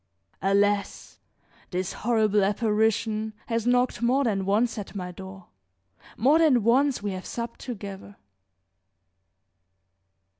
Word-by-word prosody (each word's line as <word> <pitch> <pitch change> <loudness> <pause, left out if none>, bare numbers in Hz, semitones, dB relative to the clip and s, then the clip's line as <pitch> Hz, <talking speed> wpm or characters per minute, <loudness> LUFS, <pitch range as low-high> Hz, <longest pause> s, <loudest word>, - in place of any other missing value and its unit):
Alas! 200 +1 0 0.5
this 185 +1 -3
horrible 215 -3 +1
apparition 215 +1 0
has 230 0 -2
knocked 245 0 +2
more 255 +4 +2
than 200 -6 0
once 220 +3 +1
at 205 0 -8
my 180 -2 -5
door; 190 +1 -11 0.7
more 280 +8 +4
than 280 -9 +4
once 255 +1 +2
we 205 - -2
have 185 0 -6
supped 235 0 -5
together. 200 -4 -8
215 Hz, 110 wpm, -26 LUFS, 195-240 Hz, 0.7 s, more